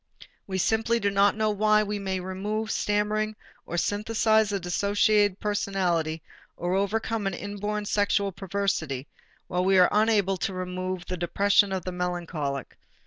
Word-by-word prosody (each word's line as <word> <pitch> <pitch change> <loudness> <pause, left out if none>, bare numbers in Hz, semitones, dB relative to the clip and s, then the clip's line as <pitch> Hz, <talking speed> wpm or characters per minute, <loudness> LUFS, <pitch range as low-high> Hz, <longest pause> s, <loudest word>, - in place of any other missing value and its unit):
We 190 -1 -2
simply 225 +4 +1
do 200 -2 0
not 200 +1 +3
know 215 -1 +1
why 215 +1 +3
we 205 0 -3
may 190 -1 -2
remove 205 +4 -3
stammering 210 +1 0 0.3
or 175 - -3
synthesize 220 +2 +2
a 200 - -1
dissociated 205 +2 +2
personality 180 -6 -1 0.3
or 175 +1 -2
overcome 205 +2 0
an 195 - -2
inborn 205 +2 -4
sexual 200 -1 +1
perversity, 190 -8 -2 0.4
while 180 0 -1
we 190 +1 +4
are 180 -1 +6
unable 205 -3 +2
to 190 +1 -3
remove 185 0 -4
the 180 - -4
depression 200 +3 +3
of 190 -2 -3
the 185 - -3
melancholic. 175 -6 -4
200 Hz, 145 wpm, -26 LUFS, 185-210 Hz, 0.4 s, are